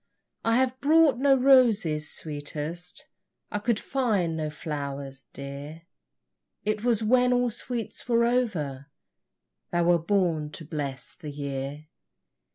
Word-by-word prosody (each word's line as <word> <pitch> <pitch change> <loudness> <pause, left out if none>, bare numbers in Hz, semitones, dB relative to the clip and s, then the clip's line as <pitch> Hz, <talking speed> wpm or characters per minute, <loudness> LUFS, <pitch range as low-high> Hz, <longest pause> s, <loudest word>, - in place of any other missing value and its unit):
I 230 0 +3
have 260 0 +1
brought 300 -3 +5
no 275 0 +5
roses, 225 - +4
sweetest, 155 +3 -5 0.4
I 210 - -1
could 230 +1 +1
find 210 -11 0
no 155 -1 -2
flowers, 140 -3 -5
dear, 140 +4 -8 0.8
It 215 0 -1
was 235 -3 +2
when 250 +3 +4
all 245 -1 +2
sweets 240 +1 -6
were 235 0 +4
over 170 - -1 0.8
Thou 175 0 +1
wert 170 -1 +2
born 175 -7 +1
to 160 - -7
bless 145 -4 -4
the 150 - -9
year. 140 +1 -5
175 Hz, 125 wpm, -27 LUFS, 150-240 Hz, 0.8 s, brought